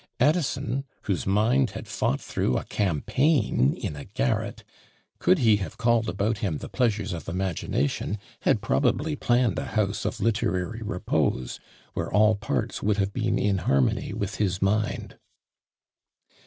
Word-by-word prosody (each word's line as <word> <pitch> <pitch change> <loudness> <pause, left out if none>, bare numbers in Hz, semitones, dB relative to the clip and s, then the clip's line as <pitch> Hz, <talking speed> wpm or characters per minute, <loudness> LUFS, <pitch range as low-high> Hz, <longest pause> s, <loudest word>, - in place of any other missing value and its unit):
Addison, 135 -3 +1 0.2
whose 95 -4 -1
mind 115 +6 +3
had - - -8
fought 70 - 0
through 65 - -1
"a - - -2
campaign!" 105 - +1
in 75 - -4
a 70 - -8
garret, - - -1 0.6
could 185 - +4
he 115 -7 +4
have 100 - -6
called 115 -1 +2
about 100 +4 -1
him 90 -7 -1
"the - - -8
pleasures 110 -7 0
of 80 -3 -6
imagination," 90 0 -1 0.2
had - - +1
probably 150 +2 +1
planned 120 -3 +2
a - - -3
house 100 -1 +1
of - - -2
literary 105 -1 0
repose, 90 - -1 0.3
where - - -3
all 105 +1 +5
parts 100 -10 -2
would 105 0 +1
have 100 0 0
been 115 0 0
in 100 -2 +1
harmony 70 -6 +1
with 100 0 -3
his 95 -3 0
mind. 105 +2 -1
105 Hz, 145 wpm, -26 LUFS, 95-120 Hz, 0.6 s, all